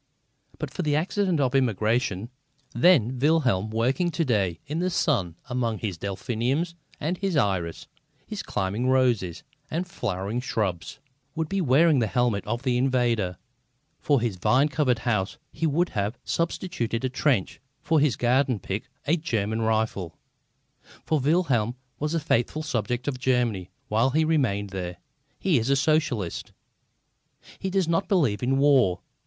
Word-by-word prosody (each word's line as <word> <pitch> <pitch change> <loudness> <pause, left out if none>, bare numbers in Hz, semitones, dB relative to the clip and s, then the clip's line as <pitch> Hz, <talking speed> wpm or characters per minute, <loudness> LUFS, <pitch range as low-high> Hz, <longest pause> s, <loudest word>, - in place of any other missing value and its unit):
But - - -5
for - - -3
the 150 -3 +1
accident 185 +1 +1
of 130 -2 +1
emigration, 115 -3 +1 0.4
then, 125 - +4
Wilhelm, 130 -9 +2
working 130 +10 +1
to 165 0 -1
day 100 - 0
in 155 +3 -3
the 180 +1 +1
sun 120 - 0
among 120 -3 -1
his 105 -5 -3
Delphiniums 120 - -2 0.3
and 170 +5 -2
his 195 -5 0
iris, 95 - 0 0.4
his - - -5
climbing 100 +6 -2
roses 120 -10 +1 0.3
and 175 +3 -2
flowering 105 - -3
shrubs, 100 -8 -2 0.4
would 160 -1 -1
be 195 +2 -1
wearing 150 +1 +4
the 115 - +1
helmet 120 -3 +1
of 120 +4 -2
the 125 -2 +1
invader; 120 -8 +1 0.6
for 145 -2 +2
his 115 -5 -2
vine 130 +10 +3
covered 135 -4 +1
house 105 -5 0
he 160 +2 -1
would 170 +4 +1
have 105 +3 -2
substituted 150 -9 -2
a - - +3
trench; 130 -5 0 0.2
for 160 -1 +3
his 145 -3 +3
garden 125 0 +2
pick 100 +6 -5 0.2
a 155 - +3
German 110 - -1
rifle. 110 -6 -1 0.9
For 155 - +1
Wilhelm 135 -6 +1 0.2
was 150 +3 -1
a - - +2
faithful 155 +1 0
subject 120 -2 -2
of 130 -3 -2
Germany 120 -8 0 0.2
while 115 +5 +2
he 155 +4 +2
remained 115 -11 +1
there. 90 -2 -5 0.4
He 175 -9 +2
is 115 +3 -2
a 140 - +4
Socialist. 140 - 0 1.1
He 190 - -2
does 190 -2 +1
not 165 +3 0
believe 140 - +2
in 130 +2 +1
war. 135 -10 +4
125 Hz, 150 wpm, -26 LUFS, 110-155 Hz, 1.1 s, then